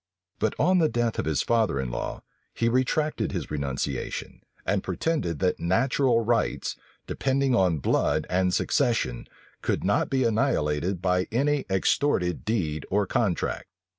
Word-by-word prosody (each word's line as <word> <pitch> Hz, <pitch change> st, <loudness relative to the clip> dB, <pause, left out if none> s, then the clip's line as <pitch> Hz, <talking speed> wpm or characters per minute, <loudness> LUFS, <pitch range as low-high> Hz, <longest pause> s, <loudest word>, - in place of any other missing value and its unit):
But 110 Hz, -, 0 dB
on 180 Hz, +4 st, +3 dB
the 160 Hz, -2 st, +3 dB
death 120 Hz, -1 st, -1 dB
of -, -, -1 dB
his 80 Hz, -1 st, +1 dB
father 110 Hz, -11 st, +1 dB
in 65 Hz, -2 st, -3 dB
law, -, -, -4 dB, 0.3 s
he 115 Hz, -, +1 dB
retracted 130 Hz, +5 st, +1 dB
his -, -, -4 dB
renunciation, 70 Hz, -3 st, -3 dB, 0.2 s
and -, -, +1 dB
pretended 100 Hz, -, -1 dB
that 90 Hz, +2 st, 0 dB
natural 120 Hz, +6 st, +2 dB
rights, 115 Hz, 0 st, 0 dB, 0.3 s
depending 135 Hz, 0 st, 0 dB
on 90 Hz, -8 st, +3 dB
blood 70 Hz, -, +1 dB
and 90 Hz, 0 st, +1 dB
succession, 115 Hz, -, 0 dB, 0.3 s
could -, -, -1 dB
not -, -, +1 dB
be 135 Hz, -1 st, +1 dB
annihilated 95 Hz, -, 0 dB
by 90 Hz, 0 st, +1 dB
any 140 Hz, +5 st, +1 dB
extorted 95 Hz, -1 st, +1 dB
deed 80 Hz, -9 st, -1 dB
or 100 Hz, +1 st, +2 dB
contract. 95 Hz, -3 st, -1 dB
110 Hz, 140 wpm, -26 LUFS, 90-130 Hz, 0.3 s, on